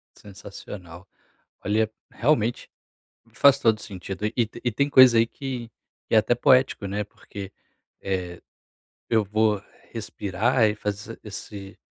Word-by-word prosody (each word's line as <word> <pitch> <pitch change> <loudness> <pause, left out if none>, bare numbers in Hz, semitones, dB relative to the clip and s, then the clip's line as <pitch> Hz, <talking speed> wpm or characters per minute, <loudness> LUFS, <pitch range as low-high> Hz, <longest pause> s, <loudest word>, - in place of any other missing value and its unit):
Sensacional. 95 -2 -11 0.6
Olha 110 +1 +1 0.2
realmente, 120 -4 0 0.6
me 115 -1 -26
faz 140 +3 +6
todo 115 -4 +3
o - - -14
sentido, 95 0 -6
e 120 - +3
tem 120 - -12
e 120 - +1
tem 140 +6 0
coisa 130 -4 +8
aí 115 0 +4
que 125 -3 -6 0.4
que - - +1
é - - +7
até 115 +3 +3
poético, 125 -3 +3
né, 100 +2 -2
porque, 100 -1 -10 0.5
eh, 90 -3 -3 0.7
eu 110 -2 +3
vou 105 0 +1 0.3
respirar 110 +2 0
e 105 -1 +1
fazer 105 +2 -5
esse 100 -2 -9
105 Hz, 140 wpm, -25 LUFS, 100-120 Hz, 0.7 s, coisa